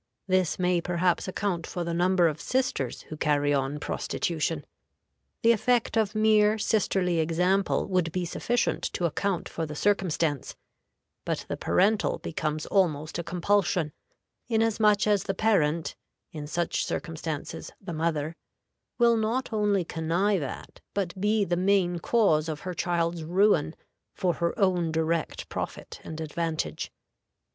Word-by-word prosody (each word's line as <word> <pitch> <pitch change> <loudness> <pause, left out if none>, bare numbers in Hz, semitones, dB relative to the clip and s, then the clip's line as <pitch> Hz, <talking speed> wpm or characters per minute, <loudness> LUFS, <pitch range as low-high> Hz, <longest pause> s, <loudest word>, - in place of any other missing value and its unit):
This 185 -4 +1
may 180 -1 +2
perhaps 175 +1 0
account 185 -3 -2
for 175 - -3
the 170 0 -3
number 180 0 +3
of 155 -1 -3
sisters 250 - -1
who 155 - -8
carry 145 -1 +2
on 140 +1 -1
prostitution. 160 0 -2 0.8
The 230 - +7
effect 235 +2 +2
of 220 -2 +1
mere 215 0 +4
sisterly 190 -5 +1
example 180 +4 +1
would 180 -4 +1
be 180 +1 -2
sufficient 240 +7 0
to 175 - -1
account 180 +2 -1
for 165 -1 -4
the 150 - -6
circumstance, 165 -6 0 0.7
but - - -2
the - - -2
parental 205 +3 +2
becomes 155 -1 -3
almost 160 -5 +1
a - - -2
compulsion, 175 -3 +1 0.5
inasmuch 220 -2 +3
as 205 -2 +2
the 195 - -1
parent 170 -7 +1 0.4
(in 150 -2 -6
such 170 +2 -1
circumstances, 160 -2 -4
the 185 -3 -6
mother) 160 -1 -1 0.6
will 235 -1 +5
not 225 +3 -1
only 205 -4 +2
connive 170 +5 0
at, 135 - -7 0.2
but 190 -4 -1
be 210 0 +2
the 175 - 0
main 180 -1 +2
cause 165 -7 +2
of 150 -1 -4
her 185 - -4
child's 170 -1 -1
ruin 175 -2 +2 0.4
for 180 -2 +1
her 170 +1 -1
own 180 -4 +2
direct 160 0 -1
profit - - -6
and 160 - -7
advantage. 160 0 -3
175 Hz, 140 wpm, -27 LUFS, 160-200 Hz, 0.8 s, The